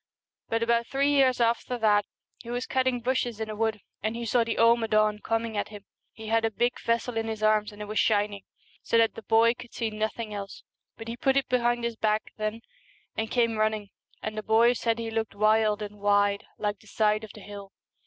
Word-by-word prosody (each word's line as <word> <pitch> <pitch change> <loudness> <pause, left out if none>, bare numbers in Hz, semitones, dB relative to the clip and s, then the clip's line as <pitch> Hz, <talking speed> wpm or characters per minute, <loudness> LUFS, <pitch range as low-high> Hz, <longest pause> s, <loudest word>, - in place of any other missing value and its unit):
But 230 0 +1
about 235 0 +1
three 280 +1 +1
years 265 -3 +4
after 235 +1 +1
that 210 -2 +3 0.3
he 235 - -11
was 245 +1 -2
cutting 260 -2 0
bushes 240 -2 -1
in 220 -1 -3
a - - -5
wood 220 -1 -1 0.2
and 215 +2 -2
he 235 0 -4
saw 235 +1 +3
the 230 0 -3
Ama 230 0 +4
ddn 215 -1 +2
coming 225 0 -1
at 205 - -1
him. 205 -2 -11 0.3
He 220 - -11
had 225 0 +2
a 225 - +2
big 240 +3 -1
vessel 230 0 -1
in 225 0 -1
his 220 -1 -4
arms, 215 0 +3
and 210 0 -8
it - - -8
was 215 +1 -1
shining, 205 -2 +1 0.4
so 230 - +1
that 225 -1 +4
the - - -9
boy 225 +2 +4
could 245 -1 -13
see 225 -2 -2
nothing 215 +1 -3
else; 200 -1 -7 0.3
but 225 - -9
he 230 - -4
put 270 +3 +1
it 275 - +1
behind 240 -1 +1
his 235 -1 -2
back 215 0 0
then 215 +1 -3 0.5
and 220 0 -2
came 230 -2 +1
running, 215 -1 0 0.3
and 215 0 -4
the 215 - -3
boy 225 +3 +4
said 230 -1 0
he 230 -1 -4
looked 220 -2 -2
wild 215 0 +3
and 210 0 -8
wide, 205 0 +2
like 205 -1 -2
the 215 - -20
side 215 +1 +1
of 215 - -9
the - - -11
hill. 200 -1 -10
225 Hz, 225 wpm, -27 LUFS, 215-235 Hz, 0.5 s, years